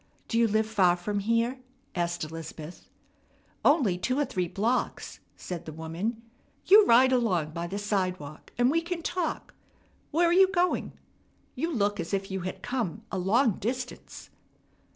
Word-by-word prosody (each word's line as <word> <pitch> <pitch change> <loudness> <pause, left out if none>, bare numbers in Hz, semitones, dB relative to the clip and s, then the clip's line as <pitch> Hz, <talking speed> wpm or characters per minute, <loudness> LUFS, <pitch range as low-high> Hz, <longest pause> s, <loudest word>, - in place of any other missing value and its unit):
"Do 230 - 0
you 230 - +5
live 220 +1 +2
far 195 -5 +3
from 205 +3 -2
here?" 230 +5 0 0.3
asked 175 -1 -1
Elizabeth. 160 +1 -8 0.7
"Only 245 - +3
two 255 +8 0
or 290 - +2
three 180 -7 -2
blocks," 225 +8 -2 0.2
said 175 -2 -6
the - - -5
woman. 170 +9 -4 0.4
"You 415 +2 +7
ride 255 +3 +6
along 185 -11 +1
by 170 +2 -4
the 195 +3 -4
sidewalk, 185 -7 -3
and 245 +2 +4
we 330 +2 +2
can 335 0 -4
talk. 350 -1 -3 0.6
Where 340 +3 +3
are 340 - +3
you 380 +1 +7
going? 360 -1 0 0.6
You 335 +1 -2
look 205 -6 0
as 170 - -1
if 195 0 -4
you 190 - -2
had 185 +1 -6
come 235 -5 -3
a 190 - -2
long 215 +4 +2
distance." 250 +3 -5
215 Hz, 160 wpm, -28 LUFS, 180-255 Hz, 0.7 s, You